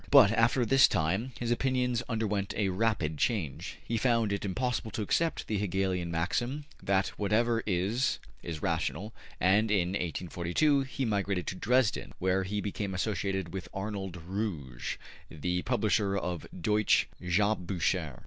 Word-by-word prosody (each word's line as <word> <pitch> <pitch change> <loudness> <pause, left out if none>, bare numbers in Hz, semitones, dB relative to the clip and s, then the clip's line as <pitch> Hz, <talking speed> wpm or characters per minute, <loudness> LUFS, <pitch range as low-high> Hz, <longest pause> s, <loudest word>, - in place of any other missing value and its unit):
But 130 -8 +8
after 115 +2 +3
this 135 +4 +6
time 95 +8 0
his 120 -1 -1
opinions 125 -1 +1
underwent 105 -4 -1
a 100 -2 +2
rapid 90 -7 0
change. 90 - -1
He 115 - -1
found 115 -4 +2
it 100 - -2
impossible 120 +3 -1
to 110 0 -3
accept 165 +10 0
the 105 -2 -1
Hegelian 95 -3 0
maxim 120 - -1 0.2
that 95 0 +1
whatever 115 +3 +2
is, 105 +7 +1 0.2
is 80 -3 -6
rational, 90 +6 -1 0.3
and 105 +4 +4
in 95 -4 +2
1842 90 - +1
he 135 0 -3
migrated 100 -4 0
to - - -3
Dresden, 125 +2 +1
where 95 +1 +1
he 105 +2 -2
became 100 -1 -3
associated 95 -2 -1
with 95 -2 -5
Arnold 95 -2 -4
Ruge, 85 - -3 0.3
the 90 +3 -2
publisher 105 -4 +1
of 90 -4 -3
``Deutsche 105 +4 +2 0.2
Jahrbuecher.'' 90 - 0
100 Hz, 140 wpm, -30 LUFS, 90-115 Hz, 0.3 s, But